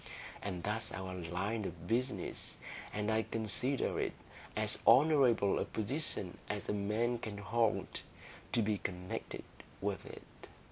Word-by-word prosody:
And 90 -4 -3
that's 110 +2 -1
our 95 -1 -4
line 90 +5 -1
of 85 -3 -5
business; 120 -3 -1 0.3
and 105 +1 0
I 110 0 +4
consider 115 +5 0
it - - 0 0.4
as - - +3
honourable 130 -8 +6
a - - +1
position 110 - -1
as 105 -1 -2
a - - +1
man 110 +4 +1
can 110 -3 -4
hold, 105 -2 +1 0.5
to 115 - +4
be 105 -1 +1
connected 90 0 -4 0.4
with 100 -1 -1
it." - - -11
105 Hz, 135 wpm, -35 LUFS, 95-115 Hz, 0.5 s, honourable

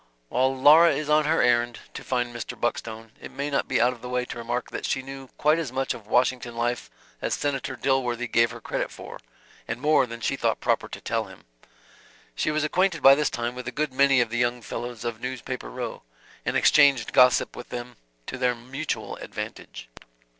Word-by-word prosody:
While 130 +2 +1
Laura 155 +5 +7
is 150 0 -2
on 155 0 +4
her 160 +2 +3
errand 120 -1 +2 0.2
to - - -7
find 120 -2 -2
Mr. 115 -3 -6
Buckstone, 115 -1 -3
it - - -8
may 140 +2 -4
not 140 - 0
be 130 -3 +1
out 125 +2 +3
of 120 - -15
the 125 - -7
way 125 0 -1
to - - -7
remark 120 +1 -3
that - - -4
she 130 - -1
knew 135 0 -9
quite 155 +2 +3
as 155 -7 -3
much 135 +1 -1
of 105 -3 -12
Washington 125 +1 +1
life 120 +1 -2 0.3
as - - 0
Senator 135 -2 -2
Dilworthy 125 -2 0
gave 115 -1 +3
her - - -9
credit - - -3
for, - - -10 0.5
and 115 +1 -3
more 150 -2 +3
than 115 0 -7
she - - -1
thought - - 0
proper - - 0
to - - -8
tell 115 -1 -1
him. 95 -2 -14 0.9
She - - -1
was 155 0 0
acquainted 180 +2 +1
by 135 - +10
this 150 +1 +1
time 120 0 -3
with 125 -1 -8
a - - -2
good 150 +1 -2
many 135 -1 +4
of 115 -2 -1
the 120 - -1
young 120 0 0
fellows 120 +1 -6
of 115 -1 -4
Newspaper 125 - -5
Row; - - -5 0.5
and - - +2
exchanged 140 -6 +4
gossip 125 -1 +5
with 125 - -9
them 120 0 -6 0.3
to 130 - -6
their 125 -1 +2
mutual 135 +6 -5
advantage. - - -7
125 Hz, 210 wpm, -25 LUFS, 120-135 Hz, 0.9 s, by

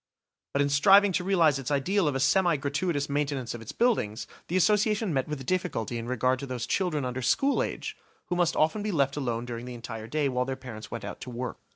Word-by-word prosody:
But 140 - +3
in 140 - 0
striving 195 +8 +6
to 180 - 0
realise 165 -7 +3
its 135 - -4
ideal 165 +6 +1
of 145 - 0
a - - 0
semi 170 +4 +3
gratuitous 145 +2 -1
maintenance 140 -3 -2
of 120 - -7
its 115 - -7
buildings, 120 - 0 0.2
the 180 - 0
Association 210 0 +2
met 135 -2 0
with 150 -2 -4
a - - -7
difficulty 130 - -2
in 115 - -6
regard 125 +1 +1
to 140 - -6
those 125 -2 -3
children 160 -8 0
under 125 +1 -3
school 270 - +2
age, - - -4 0.3
who 180 - -2
must 175 -2 +2
often 160 +7 +2
be 210 0 -2
left 140 -5 +1
alone 120 -5 -2
during 120 0 -6
the 125 - -6
entire 115 -2 -7
day 150 +3 0
while 125 -1 0
their 135 0 -3
parents 120 -4 -9
went 115 - -6
out - - -7
to - - -7
work. 125 0 -5
140 Hz, 235 wpm, -28 LUFS, 125-175 Hz, 0.3 s, striving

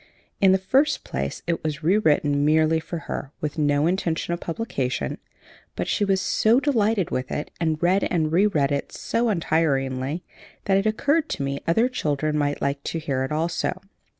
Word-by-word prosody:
In 195 -1 +5
the 190 - +5
first 270 +10 +1
place, 70 +1 -4
it 170 -1 -2
was 155 0 -3
re 175 +6 +4
written 145 -7 +2
merely 155 +1 +3
for 165 +2 -6
her, 135 - -5
with 155 +1 -4
no 145 0 +2
intention 170 -1 0
of 170 - -3
publication; 135 - -3 0.6
but - - -3
she - - +1
was 195 -1 +2
so 225 +5 +3
delighted 220 - +1
with 130 0 -3
it, 150 - -3
and 160 -2 0
read 185 +3 +3
and 160 -3 0
reread 165 -6 +2
it 140 0 -2
so 235 0 -1
untiringly, 150 -4 0 0.4
that 195 -1 +3
it 195 +2 +1
occurred 290 +8 +1
to 140 - -2
me 140 0 -3
other 225 +9 +3
children 155 - -1
might 145 -1 -1
like 140 0 -1
to - - -2
hear 140 -5 -2
it 130 - -4
also. 165 +3 -1
160 Hz, 180 wpm, -24 LUFS, 145-195 Hz, 0.6 s, In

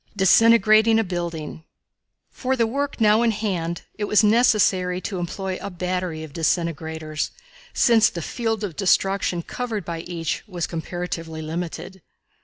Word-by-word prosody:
Disintegrating 220 +2 +5
a 225 - +3
Building. 170 -4 -5 0.7
For 260 0 -1
the 235 -3 +2
work 280 +5 -3
now 215 0 +4
in 235 - +3
hand 185 -6 -2 0.2
it 205 - 0
was 210 +1 +4
necessary 210 -5 +3
to 190 -2 -4
employ 185 +2 -4
a 200 - -5
battery 180 -3 -3
of 155 -3 -10
disintegrators, 160 -1 -2 0.4
since 230 -3 +4
the 170 - -6
field 225 0 -2
of 185 -6 -4
destruction 195 -2 +1
covered 225 -5 -4
by 170 -1 -4
each 165 -1 -3
was 175 -4 -3
comparatively 165 -1 -5
limited. 175 +3 -5
185 Hz, 140 wpm, -23 LUFS, 170-220 Hz, 0.7 s, Disintegrating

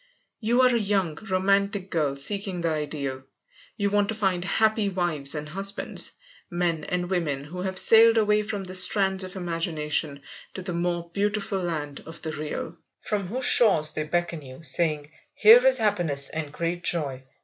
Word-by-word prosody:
You 235 +3 +2
are 250 -1 +4
a - - +2
young, 195 -6 0 0.2
romantic 195 +1 +1
girl 150 -5 0
seeking 185 +5 -3
the 165 -1 0
ideal. 140 -3 -4 0.5
You 200 -1 0
want 205 0 +2
to 220 - -2
find 190 -4 0
happy 215 +2 +1
wives 170 -7 -1
and 150 0 -5
husbands, 195 +4 -4 0.4
men 175 -2 -1
and 180 0 -2
women 160 -7 -1
who 175 +5 -7
have 190 0 -3
sailed 225 +2 +6
away 210 -1 +3
from 210 -2 -4
the 185 0 -8
Strands 190 +1 +3
of 185 +1 -8
Imagination 160 -5 -2 0.3
to 190 - -6
the 180 -1 -4
more 170 0 -2
beautiful 205 0 -1
land 155 -5 -4
of 165 +1 -9
the 160 - -3
Real, 155 +2 -5 0.2
from 205 -3 -2
whose 250 +6 -2
shores 160 -10 +5
they - - -3
beckon 170 0 -2
you, 130 +3 -12
saying: 150 0 -1 0.2
"Here 225 +3 +8
is 260 0 +4
happiness 175 - 0
and 155 -2 -5
great 170 +3 -3
joy. 140 -7 0
180 Hz, 170 wpm, -25 LUFS, 155-200 Hz, 0.5 s, Here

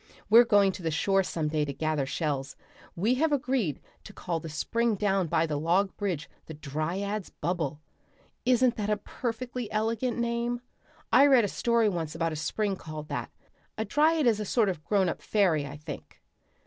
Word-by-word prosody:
We're 235 +2 +9
going 205 -3 +4
to 185 - -9
the 165 - -1
shore 195 +5 +2
some 165 -4 -2
day 155 -1 0
to 140 -1 -3
gather 155 -2 -1
shells. 140 -2 -2 0.4
We 210 +8 +2
have 320 -1 +3
agreed 255 - 0 0.2
to 210 - -11
call 170 -4 -3
the 160 - -8
spring 230 +8 0
down 195 -3 +1
by 165 0 +2
the 150 -2 -2
log 180 +5 +1
bridge 180 -7 -3 0.2
the 160 - -7
Dryad's 170 +8 -3
Bubble. 160 -3 -3 0.6
Isn't 250 -1 +3
that 210 -1 -2
a 210 - +2
perfectly 235 +1 -5
elegant 225 +3 -1
name? 235 0 -1 0.5
I 270 +4 +8
read 260 -6 +5
a - - 0
story 235 +2 +2
once 165 -6 -2
about 165 -1 -1
a - - -4
spring 200 +6 -1
called 155 -2 -8
that. - - -3 0.5
A 220 - -1
dryad 310 +6 +3
is 215 -4 +1
sort 225 -5 +3
of 180 - -2
a 155 - -29
grown 195 -3 +3
up 170 - -3
fairy, 170 -9 +2
I 140 +1 -8
think." 150 - -9
195 Hz, 185 wpm, -28 LUFS, 160-230 Hz, 0.6 s, We're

